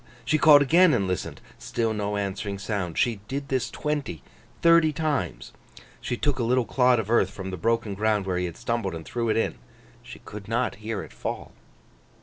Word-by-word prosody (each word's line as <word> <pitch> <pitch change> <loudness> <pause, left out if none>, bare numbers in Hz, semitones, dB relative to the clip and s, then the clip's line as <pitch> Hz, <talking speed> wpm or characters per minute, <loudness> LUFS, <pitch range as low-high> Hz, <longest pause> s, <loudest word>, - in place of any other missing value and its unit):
She 155 +6 +2
called 145 -2 +8
again 165 +2 +5
and 100 -5 0
listened; 90 -2 -4 0.2
still 115 -1 -1
no 105 -1 -2
answering 100 0 -3
sound. 100 -4 -3
She 120 -3 +2
did 140 +1 -4
this, 130 -2 0
twenty, 145 - -3 0.4
thirty 165 -2 +6
times. 150 - -2 0.5
She 120 - -3
took 145 -1 0
a - - +1
little 125 +1 +2
clod 125 +2 +3
of 110 -1 -3
earth 105 -5 +4
from 95 -1 -7
the - - -3
broken 115 +3 0
ground 105 0 0
where 90 -2 -1
he 90 - -1
had 85 - -6
stumbled, 115 -7 -2
and 80 -1 -8
threw 115 +4 -2
it 110 - +2
in. 115 - -1 0.4
She - - -11
could 100 -1 -10
not 120 -1 -1
hear 110 -2 -3
it - - -13
fall. - - -5
115 Hz, 195 wpm, -26 LUFS, 100-130 Hz, 0.5 s, called